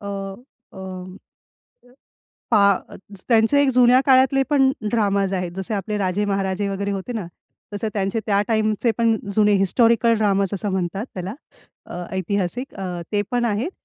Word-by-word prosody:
अ, 200 Hz, -, -9 dB
अ, 200 Hz, +3 st, -9 dB
अ, 185 Hz, -1 st, -7 dB, 1.5 s
पा 215 Hz, -3 st, +5 dB, 0.3 s
अ, -, -, -11 dB, 0.3 s
त्यांचे 230 Hz, +4 st, +4 dB
एक 280 Hz, -, +2 dB
जुन्या 250 Hz, +1 st, +6 dB
काळातले 265 Hz, 0 st, +4 dB
पण 270 Hz, -2 st, +4 dB, 0.2 s
ड्रामाज 200 Hz, -4 st, +1 dB
आहेत, 180 Hz, -2 st, -2 dB
जसे 190 Hz, +3 st, -3 dB
आपले 210 Hz, +1 st, -3 dB
राजे 195 Hz, +1 st, 0 dB
महाराजे 195 Hz, 0 st, -1 dB
वगैरे 200 Hz, +1 st, -3 dB
होते 195 Hz, +4 st, -4 dB
ना, 215 Hz, -6 st, -4 dB, 0.5 s
तसे 210 Hz, +2 st, -2 dB
त्यांचे 200 Hz, +2 st, -1 dB
त्या 200 Hz, -2 st, +2 dB
टाईमचे 220 Hz, +1 st, +1 dB
पण 230 Hz, -1 st, +3 dB, 0.2 s
जुने 210 Hz, 0 st, +4 dB
हिस्टॉरिकल 230 Hz, +4 st, +3 dB
ड्रामाज 200 Hz, -2 st, +2 dB
असं 200 Hz, +1 st, -3 dB
म्हणतात 190 Hz, +4 st, -2 dB
त्याला. 185 Hz, +3 st, -5 dB, 0.5 s
अ, -, -, -9 dB, 0.2 s
ऐतिहासिक 200 Hz, +7 st, -2 dB
अ, 180 Hz, -3 st, -5 dB
ते 205 Hz, -1 st, +2 dB
पण 245 Hz, -1 st, 0 dB
आहेत. 230 Hz, -, -1 dB
205 Hz, 155 wpm, -22 LUFS, 195-235 Hz, 1.5 s, जुन्या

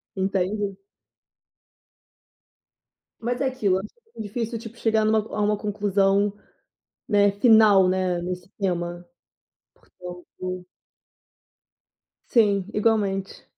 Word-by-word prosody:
entende? 195 Hz, +1 st, -1 dB, 2.4 s
Mas 245 Hz, +2 st, -2 dB
é 275 Hz, -, +1 dB
aquilo, 215 Hz, -8 st, +1 dB
acho 195 Hz, +2 st, -6 dB, 0.3 s
muito -, -, -6 dB
difícil, 230 Hz, +2 st, -4 dB
tipo, 225 Hz, 0 st, -10 dB
chegar 220 Hz, -2 st, +1 dB
numa 220 Hz, +1 st, +3 dB
a 215 Hz, 0 st, -5 dB
uma 210 Hz, 0 st, +2 dB
conclusão, 200 Hz, -1 st, +1 dB, 0.8 s
né, 205 Hz, -1 st, +4 dB
final, 205 Hz, -2 st, +6 dB
né, 185 Hz, -1 st, 0 dB
nesse 180 Hz, +1 st, -5 dB
tema. 175 Hz, -2 st, -2 dB, 0.7 s
Portanto 180 Hz, 0 st, -9 dB, 1.6 s
Sim, 200 Hz, -5 st, +3 dB
igualmente. 205 Hz, -3 st, 0 dB
200 Hz, 95 wpm, -24 LUFS, 185-220 Hz, 2.4 s, final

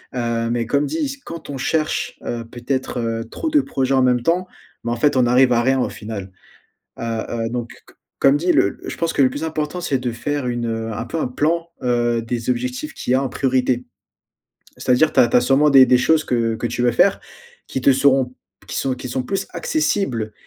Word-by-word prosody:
heu, 115 Hz, -1 st, -1 dB
mais 120 Hz, -1 st, 0 dB
comme 140 Hz, +5 st, +1 dB
dis: 285 Hz, -, -3 dB
«Quand 165 Hz, -3 st, -8 dB
on 140 Hz, -, -4 dB
cherche, 160 Hz, -, -1 dB
heu, 120 Hz, -1 st, -3 dB
peut-être, 125 Hz, +2 st, -3 dB
heu, 115 Hz, -1 st, -2 dB
trop 320 Hz, -, -3 dB
de 300 Hz, -2 st, +4 dB
projets 135 Hz, -, -1 dB
en 130 Hz, -, +4 dB
même 125 Hz, -1 st, +3 dB
temps, 180 Hz, +4 st, +1 dB, 0.4 s
bah, 120 Hz, -, -2 dB
en -, -, 0 dB
fait, 145 Hz, +5 st, +2 dB
on 130 Hz, -1 st, +4 dB
arrive 125 Hz, +1 st, +4 dB
à 120 Hz, -, +3 dB
rien 130 Hz, +2 st, +2 dB
au -, -, 0 dB
final, 105 Hz, -4 st, -7 dB, 0.7 s
heu -, -, -7 dB, 0.3 s
heu,», 115 Hz, -1 st, -2 dB
donc 120 Hz, -1 st, -3 dB, 0.2 s
que -, -, -20 dB, 0.3 s
comme 135 Hz, +1 st, +5 dB
dit: 175 Hz, +4 st, +2 dB
«Le 100 Hz, -, +2 dB
je -, -, -5 dB
pense 165 Hz, -1 st, -1 dB
que -, -, +2 dB
le 130 Hz, -, +4 dB
plus 145 Hz, +4 st, -5 dB
important 160 Hz, +2 st, -3 dB
c'est 140 Hz, -6 st, 0 dB
de 125 Hz, -2 st, -3 dB
faire 140 Hz, +3 st, -3 dB
une, 120 Hz, -1 st, -2 dB
heu, 115 Hz, 0 st, -3 dB
un 115 Hz, -, -4 dB
peu 165 Hz, -, -4 dB
un 130 Hz, -, -1 dB
plan, 165 Hz, +6 st, 0 dB
heu, 120 Hz, -2 st, +1 dB
des 115 Hz, +1 st, -3 dB
objectifs 125 Hz, +4 st, -3 dB
qu'il 125 Hz, -, -2 dB
y -, -, +4 dB
a 130 Hz, -, +2 dB
en 135 Hz, -, -1 dB
priorité». 125 Hz, -1 st, 0 dB, 0.9 s
C'est -, -, -4 dB
à -, -, +7 dB
dire, 155 Hz, +5 st, +3 dB
tu -, -, +4 dB
as 120 Hz, -, +5 dB
tu -, -, +3 dB
as -, -, +6 dB
sûrement 135 Hz, +4 st, +4 dB
des 135 Hz, -2 st, +8 dB
des 125 Hz, 0 st, +5 dB
choses 155 Hz, +5 st, +3 dB
que 115 Hz, -2 st, 0 dB
que 115 Hz, -, -3 dB
tu 120 Hz, -, -3 dB
veux 120 Hz, -1 st, +3 dB
faire, 195 Hz, +10 st, +3 dB, 0.5 s
qui 130 Hz, -, -3 dB
te 135 Hz, -, +6 dB
seront 135 Hz, -1 st, +2 dB, 0.3 s
qui -, -, -6 dB
sont 135 Hz, -1 st, 0 dB
qui 125 Hz, -, -7 dB
sont 130 Hz, +1 st, -2 dB
plus 195 Hz, +8 st, -2 dB
accessibles 155 Hz, -, -1 dB
130 Hz, 235 wpm, -20 LUFS, 120-150 Hz, 0.9 s, des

